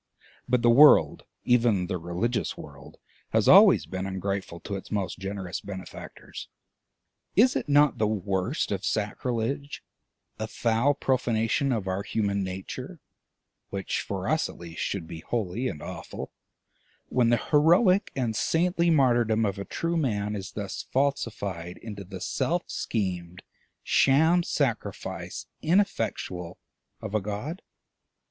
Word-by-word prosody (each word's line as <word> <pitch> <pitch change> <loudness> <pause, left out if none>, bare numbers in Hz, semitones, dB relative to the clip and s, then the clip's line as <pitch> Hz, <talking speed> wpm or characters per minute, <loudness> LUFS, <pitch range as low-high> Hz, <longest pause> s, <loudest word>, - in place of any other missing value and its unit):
But 125 -1 +2
the 120 - +5
world, 145 +5 +6 0.2
even 115 -6 +3
the 90 -1 -3
religious 90 +8 -2
world, 70 -2 -12 0.4
has - - +3
always - - +8
been 95 +1 -4
ungrateful 95 -2 -3
to 100 - -6
its 95 - -7
most 100 -3 -2
generous 95 -2 -5
benefactors. 95 -2 -9 0.9
Is 250 +6 +5
it - - -2
not 145 -3 +4
the 110 - +3
worst 100 - -1
of 100 -1 -2
sacrilege, 120 +7 -2 0.6
a 110 - -2
foul 115 +6 +1
profanation 125 0 +1
of 110 -6 -1
our 95 +1 -1
human 100 -1 -1
nature, 95 0 -6 0.7
which 95 -1 -2
for - - -4
us, - - +1
at - - -11
least, 85 -1 -8
should 95 -4 -2
be 80 0 -8
holy 115 +5 -2
and 75 - -5
awful, - - -7 0.8
when 120 -2 +2
the 120 - +4
heroic 175 - +4
and 120 -5 -1
saintly 170 - +1
martyrdom 120 -7 +3
of 100 -1 -2
a 100 - -4
true 170 0 -2
Man 105 -8 -1
is 100 -1 -6
thus 100 -2 -4
falsified 100 -10 -2
into 105 -3 -8
the 95 0 -9
self 175 +1 -1
schemed 90 -5 -3 0.4
sham 160 +6 +4
sacrifice, 120 - -3 0.2
ineffectual, 115 - 0 0.4
of - - -6
a 110 - +1
God? 105 - -5
110 Hz, 135 wpm, -27 LUFS, 95-135 Hz, 0.9 s, always